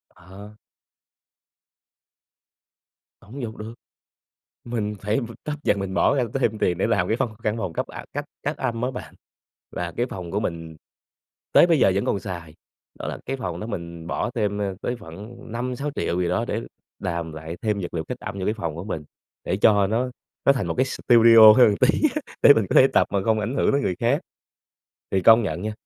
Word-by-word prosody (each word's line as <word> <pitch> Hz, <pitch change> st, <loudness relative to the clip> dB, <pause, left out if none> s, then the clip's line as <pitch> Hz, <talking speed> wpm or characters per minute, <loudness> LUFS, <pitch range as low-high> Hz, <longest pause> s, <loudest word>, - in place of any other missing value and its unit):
Ờ. 100 Hz, +4 st, -13 dB, 2.6 s
Hổng 125 Hz, +7 st, -9 dB
giục 110 Hz, -2 st, -5 dB
được. 110 Hz, +2 st, -7 dB, 0.9 s
Mình 110 Hz, -3 st, -3 dB
phải 105 Hz, +3 st, 0 dB, 0.2 s
tấp 150 Hz, -, -3 dB
dần, 105 Hz, -, +2 dB
mình 95 Hz, -1 st, -4 dB
bỏ 140 Hz, -, +3 dB
ra 130 Hz, -, +2 dB
thêm 120 Hz, -5 st, 0 dB
tiền 90 Hz, -, +1 dB
để 95 Hz, -, +1 dB
làm 110 Hz, -3 st, +1 dB
cái 110 Hz, -, 0 dB
văn 120 Hz, -, 0 dB
căn 105 Hz, +1 st, 0 dB
phòng 90 Hz, -7 st, -4 dB
cấp, -, -, -3 dB
à, -, -, -9 dB
cách -, -, -3 dB, 0.2 s
cách -, -, -2 dB
âm 115 Hz, -3 st, -2 dB
á 125 Hz, +1 st, -1 dB
bạn, 125 Hz, -, -8 dB, 0.6 s
là 85 Hz, -1 st, -3 dB
cái 120 Hz, -, 0 dB
phòng 90 Hz, -7 st, -7 dB
của 100 Hz, -, -1 dB
mình 80 Hz, -5 st, -5 dB, 0.8 s
tới -, -, +7 dB
bây 165 Hz, -3 st, +3 dB
giờ 95 Hz, -, +4 dB
vẫn 100 Hz, -, 0 dB
còn 100 Hz, -, 0 dB
xài. 85 Hz, -5 st, -7 dB, 0.4 s
Đó -, -, -5 dB
là -, -, -5 dB
cái 135 Hz, -, -2 dB
phòng 90 Hz, -9 st, -5 dB
đó 110 Hz, -, -5 dB
mình 85 Hz, -6 st, -7 dB
bỏ 85 Hz, -, -2 dB
thêm, 105 Hz, -3 st, -1 dB
a, 100 Hz, -1 st, -1 dB
tới 120 Hz, -, -2 dB
khoảng 105 Hz, +4 st, -11 dB, 0.2 s
5.000.000-6.000.000 125 Hz, -5 st, -2 dB
gì 90 Hz, -, 0 dB
đó, -, -, 0 dB
để -, -, -1 dB, 0.4 s
làm 85 Hz, -1 st, -3 dB
lại 80 Hz, +2 st, -7 dB
thêm 105 Hz, -2 st, 0 dB
vật 85 Hz, -, -6 dB
liệu 80 Hz, -1 st, -2 dB
cách 125 Hz, +7 st, -6 dB
âm 100 Hz, +1 st, -6 dB
vô 95 Hz, -, -3 dB
cái 105 Hz, -, 0 dB
phòng 85 Hz, -8 st, -4 dB
của 85 Hz, -, -7 dB
mình, 80 Hz, -7 st, -5 dB, 0.4 s
để -, -, -1 dB
cho 100 Hz, -1 st, +4 dB
nó 120 Hz, +5 st, -1 dB, 0.4 s
nó 140 Hz, -, +7 dB
thành 135 Hz, -, -2 dB
một -, -, -2 dB
cái 130 Hz, -, +2 dB
studio 115 Hz, -3 st, +7 dB
hơn 125 Hz, -, +7 dB
một 100 Hz, -, -1 dB
tí -, -, +3 dB
á, 305 Hz, -, -1 dB, 0.2 s
để 145 Hz, -, +9 dB
mình 110 Hz, -3 st, +1 dB
có -, -, 0 dB
thể 130 Hz, -, +8 dB
tập -, -, +4 dB
mà 100 Hz, -, 0 dB
không 110 Hz, -1 st, +2 dB
ảnh 110 Hz, +5 st, -3 dB
hưởng -, -, +2 dB
tới 140 Hz, -, +2 dB
người 95 Hz, -, -1 dB
khác. -, -, +2 dB, 0.9 s
Thì 95 Hz, -, +1 dB
công 115 Hz, +4 st, +7 dB
nhận 90 Hz, -3 st, -3 dB
nha, 110 Hz, -, -3 dB
105 Hz, 215 wpm, -23 LUFS, 90-120 Hz, 2.6 s, để